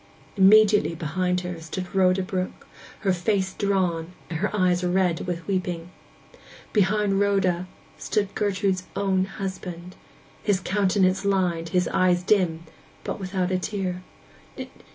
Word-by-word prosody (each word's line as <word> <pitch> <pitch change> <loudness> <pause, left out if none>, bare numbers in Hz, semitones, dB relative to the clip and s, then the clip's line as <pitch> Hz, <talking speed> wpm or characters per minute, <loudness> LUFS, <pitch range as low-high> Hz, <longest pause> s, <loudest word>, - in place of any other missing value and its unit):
Immediately 205 -2 +5
behind 180 +3 -1
her 180 -2 -6
stood 180 +3 -6
Rhoda 190 0 +3
Brook, 185 0 -4 0.4
her 195 -3 +2
face 190 +1 0
drawn, 180 -4 -1 0.2
and 160 - -2
her 210 - 0
eyes 180 -3 +1
red 180 -1 +1
with 170 -2 -3
weeping. 180 -3 -3 0.8
Behind 205 -1 +2
Rhoda 190 -3 +1 0.3
stood 205 -2 -1
Gertrude's 195 -2 0
own 190 -1 +1
husband; 185 -2 -6 0.5
his 205 -3 +1
countenance 190 -1 +1
lined, 180 -4 0
his 180 +1 +1
eyes 180 -1 +2
dim, 180 -5 +2 0.4
but - - -4
without 185 -1 -2
a 185 - +1
tear. 185 -2 -3
185 Hz, 125 wpm, -25 LUFS, 180-195 Hz, 0.8 s, Immediately